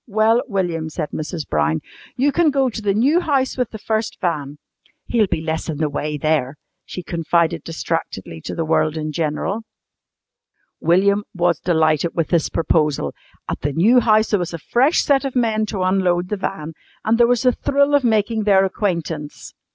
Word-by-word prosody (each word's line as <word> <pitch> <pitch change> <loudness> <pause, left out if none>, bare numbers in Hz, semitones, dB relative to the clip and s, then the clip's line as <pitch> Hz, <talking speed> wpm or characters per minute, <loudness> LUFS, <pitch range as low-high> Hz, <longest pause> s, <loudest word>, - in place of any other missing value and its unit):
"Well, 220 +2 +3
William," 175 -7 -2
said 155 -1 -4
Mrs. 155 0 -5
Brown, 75 +1 0 0.4
"you 280 +3 +3
can 330 +2 +3
go 270 -3 +1
to 220 - -6
the 200 -2 0
new 275 +10 +3
house 275 -6 0
with 250 -3 -1
the 220 - -8
first 220 +1 -2
van. 150 -5 -2 0.5
He'll 225 -4 +2
be 160 - -2
less 160 +1 -3
in 155 - -3
the 155 -1 -1
way 150 +1 -3
there," 150 -2 0 0.3
she 180 - -7
confided 170 -1 0
distractedly 160 - -4
to - - -4
the 165 - -2
world 155 0 +1
in 155 0 -3
general. 165 +7 -2 1.2
William 200 +4 +3
was 175 -2 +1
delighted 160 -1 +1
with 165 -3 -1
this 170 -3 +1
proposal. 150 - 0 0.3
At - - -4
the 145 0 -2
new 220 - +5
house 220 -2 +3
there 205 - +3
was 175 -1 -3
a 165 - -12
fresh 265 +7 +4
set 280 -1 +2
of 270 -2 -4
men 220 -3 +1
to 195 -4 -2
unload 185 -1 +1
the 210 - -1
van, 160 -4 -4 0.3
and 225 +2 +2
there 235 - +6
was 245 0 +1
the 250 - +5
thrill 280 +3 +1
of 285 -2 +4
making 220 -1 +1
their 195 -2 +5
acquaintance. 170 -6 -3
185 Hz, 185 wpm, -20 LUFS, 160-225 Hz, 1.2 s, there